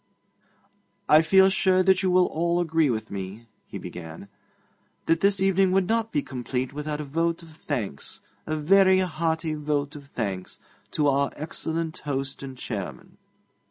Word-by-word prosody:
'I 155 +1 +8
feel 190 +4 +5
sure 185 -1 +3
you 190 0 +4
will 180 0 +5
all 170 +2 0
agree 165 -3 +2
with 110 -3 -3
me,' 100 +3 -6 0.2
he - - -7
began, 85 +3 -9 0.8
'that 165 0 +2
this 200 0 +3
evening 190 0 +3
would 190 -1 +2
not 225 0 0
be 145 - 0
complete 125 +1 -4
without 150 +1 -4
a - - -3
vote 165 +4 -1
of 165 - -14
thanks 125 - -5 0.3
a 155 - -1
very 190 +4 +5
hearty 160 -2 -1
vote 150 -1 -2
of 140 -1 -11
thanks 100 -8 -4 0.3
to 150 +4 +1
our 140 0 +2
excellent 160 +1 -4
host 135 -2 -4
and 135 -1 -8
chairman.' 105 -7 -7
155 Hz, 155 wpm, -25 LUFS, 135-175 Hz, 0.8 s, I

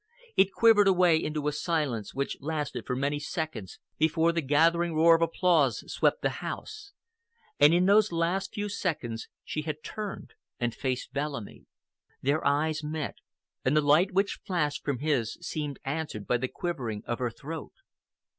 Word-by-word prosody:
It 195 0 +4
quivered 220 -3 +5
away 180 -4 +4
into 150 -1 -2
a - - +2
silence 150 - -1
which 140 +1 -2
lasted 150 -1 -3
for 125 - -1
many 140 +3 -1
seconds 150 - -5 0.2
before 160 +1 +3
the 170 0 -1
gathering 165 +4 +2
roar 165 +2 +6
of 165 - +3
applause 165 - +2
swept - - +1
the - - +2
house. 425 -2 -7 0.7
And 150 - +7
in 175 +2 +4
those 205 +1 +5
last 175 +3 0
few 205 0 -3
seconds 150 - -3 0.2
she 155 - -3
had 155 0 -5
turned 210 -2 -6 0.3
and 120 -1 -1
faced 130 -2 -3
Bellamy. 140 -6 -5 0.5
Their 145 +4 0
eyes 155 +2 +1
met, 155 0 -4 0.5
and 145 +4 +2
the - - +5
light 155 +7 +4
which 195 +2 0
flashed 155 -7 -1
from 140 -3 -1
his 130 -5 0
seemed 150 -3 -4
answered 135 -7 -3
by 125 - +2
the 130 +2 -2
quivering 125 - -4
of 120 - -3
her 125 -1 0
throat. 150 +7 -8
155 Hz, 165 wpm, -28 LUFS, 140-175 Hz, 0.7 s, And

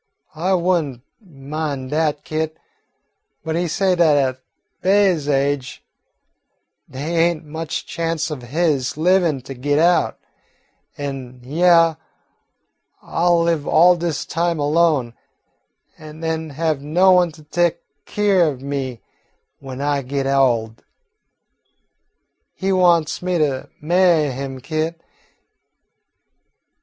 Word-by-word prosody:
I 180 +4 0
would 175 -1 +2
n't 130 -5 -9 0.2
min' 145 -5 -5
dat, 150 -1 0
Kit, 155 0 -3 0.9
but 160 0 -2
he 175 +1 0
say 190 +3 +1
dat 160 -4 +4
at 130 -2 0 0.4
Be'y's 190 -6 +2
age 140 -1 -1 1.1
dey 135 +3 -6
ain't 165 -1 +1
much 160 +1 -5
chanst 165 -1 -2
of 145 -4 -5
his 145 +1 -1
livin' 170 -4 +2
to 135 - -8
git 145 +3 -1
out, 170 +3 +2 0.8
an' 135 -3 -6
hyeah 165 +3 +3 1.1
I 170 - -2
'll 170 -1 +4
live 165 -3 0
all 175 +2 +5
dis 170 -3 -3
time 170 0 -1
alone, 145 -4 +1 0.9
an' 155 +1 -11
den 160 -1 -2
have 155 0 -1
no 175 +6 +3
one 180 -2 +4
to 155 -1 -15
tek 170 +2 0 0.3
keer 200 -4 +2
o' 150 -3 -1
me 130 -2 -5 0.6
w'en 135 -1 -8
I 145 -1 0
git 135 +1 -3
ol'. 120 -5 +1 1.8
He 195 0 -1
wants 175 -4 +2
me 180 0 -1
to 140 -4 -1
ma'y 170 -2 +3
him, 135 0 -6
Kit. 160 +3 -3
155 Hz, 120 wpm, -20 LUFS, 140-170 Hz, 1.8 s, all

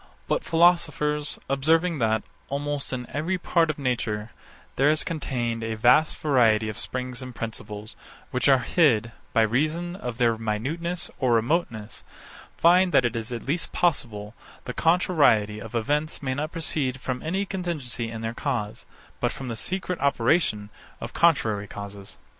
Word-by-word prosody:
But - - 0
philosophers, 165 -3 +2
observing 160 +4 +2
that, 110 -1 +1 0.3
almost 145 0 -3
in 125 -1 -3
every 165 +6 -1
part 170 -2 +2
of 155 - -2
nature, 115 -5 -2 0.4
there 140 +3 +4
is 155 0 +2
contained 120 -8 -2
a 110 0 -2
vast 125 +8 +4
variety 115 -7 +3
of 110 - -4
springs 125 0 -3
and 130 -1 -8
principles, 110 -2 -6 0.4
which 125 +2 +2
are 135 - +7
hid, 120 -10 +3 0.2
by 115 - +4
reason 155 +10 0
of 125 -10 -5
their 115 -3 +2
minuteness 145 +12 -2
or 125 -3 +2
remoteness, 115 -3 -1 0.5
find, 180 +2 +5
that 125 - +5
it 120 0 0
is 115 +1 -3
at 120 - -5
least 165 +5 -1
possible 115 -11 0 0.3
the 125 - -4
contrariety 150 - +3
of 115 +1 -8
events 145 +7 -1
may 130 -1 -1
not 150 +4 -3
proceed 145 -5 -1
from 125 0 -3
any 190 +5 -1
contingency 155 - -3
in 115 0 -6
the 115 0 -3
cause, 120 -6 -3 0.3
but - - +1
from 130 -2 -6
the 115 - -3
secret 180 +6 -2
operation 120 -5 +1 0.3
of - - -7
contrary 110 -11 +2
causes. 100 -1 -7
130 Hz, 155 wpm, -25 LUFS, 115-160 Hz, 0.5 s, are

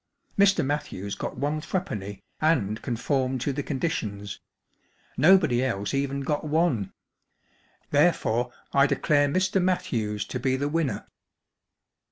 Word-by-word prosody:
Mr. 200 -6 +4
Matthews 135 -9 -3
got - - -5
one 145 +2 -1
threepenny, 105 - -4 0.2
and 115 -10 +1
conformed 130 +2 -1
to 140 - -1
the 145 - -2
con¬ 140 -1 -4
ditions. 105 - -3 0.8
Nobody 155 -8 +5
else 100 -6 -2
even 140 0 -1
got 145 +2 -1
one. 150 - +1 1.0
Therefore 125 -6 +2 0.2
I 140 0 +5
declare 145 0 +2
Mr. 185 +5 +1
Matthews 115 - -1
to 125 - -4
be 130 +1 +1
the 140 +2 -1
winner." 150 -8 -1
140 Hz, 125 wpm, -26 LUFS, 115-155 Hz, 1.0 s, Nobody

